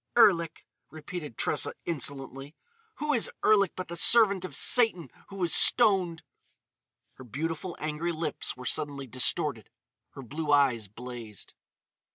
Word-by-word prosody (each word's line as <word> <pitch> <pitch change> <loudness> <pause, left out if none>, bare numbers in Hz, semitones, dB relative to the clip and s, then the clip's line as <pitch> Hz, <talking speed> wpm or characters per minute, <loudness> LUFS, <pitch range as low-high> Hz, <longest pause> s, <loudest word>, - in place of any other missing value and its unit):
"Erlik!" 170 -8 +3 0.2
repeated 155 -4 -9
Tressa - - 0
insolently. 140 -1 -4 0.4
"Who 300 0 -2
is 235 - +1 0.2
Erlik 200 -4 +3
but 185 - -6
the 170 - -7
servant 200 -1 +4
of 170 -7 -6
Satan 200 - +4 0.2
who 195 - -11
was 175 -4 -1
stoned?" 190 -8 +3 0.9
Her 130 - -11
beautiful, 160 - -5
angry 155 +3 -3
lips 155 -5 -4
were 125 - -10
suddenly 140 0 -2
distorted; 130 - -1 0.4
her 135 - -10
blue 150 +5 -4
eyes 130 -7 +2
blazed. 115 -1 -10
155 Hz, 130 wpm, -27 LUFS, 135-180 Hz, 0.9 s, servant